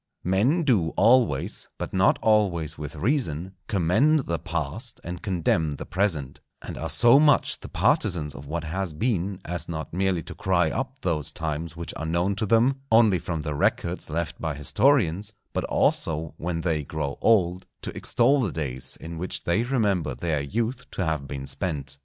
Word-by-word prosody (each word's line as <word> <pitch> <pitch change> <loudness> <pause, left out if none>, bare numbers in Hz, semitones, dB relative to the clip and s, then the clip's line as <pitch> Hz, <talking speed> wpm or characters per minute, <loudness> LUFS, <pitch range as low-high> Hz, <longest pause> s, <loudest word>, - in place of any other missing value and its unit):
Men 115 - +2
do 105 - +2
always, 120 - +3
but - - -5
not 95 0 +4
always 90 -8 +2
with 75 0 -7
reason, 95 - -1
commend 110 - +3
the 85 -9 -3
past 85 - -4
and 90 +1 -6
condemn 85 -5 0
the - - -7
present, 80 -8 -1 0.2
and - - -7
are 80 - -4
so 120 +3 +7
much 150 -1 +3
the - - -10
partisans 80 -7 +1
of 70 0 -10
what 85 +2 -3
has 90 +1 -3
been, 95 0 -1
as 85 -1 -4
not 80 -2 -5
merely 95 -2 0
to - - -8
cry 90 -4 +1
up 130 +1 -3
those 75 -5 -1
times 80 +1 -4
which 85 - -5
are 80 - -4
known 85 +4 +1
to 110 0 -1
them 120 +5 +3
only 110 -5 +5
from 80 0 -3
the 75 0 -3
records 85 +5 -1
left 80 0 -3
by 80 -3 -2
historians, 100 - +2 0.2
but - - -1
also, 80 0 +1
when 85 0 -3
they 80 -3 0
grow 70 -1 -4
old, 90 -5 +2 0.2
to - - -6
extol 140 0 +2
the 105 -8 -1
days 65 -5 -4
in 80 0 -8
which 90 - -3
they 100 +7 +1
remember 105 - 0
their 80 -4 -1
youth 115 - -3
to 95 - -3
have 80 -3 -2
been 70 -1 -5
spent. 70 -2 -4
85 Hz, 175 wpm, -25 LUFS, 80-110 Hz, 0.2 s, so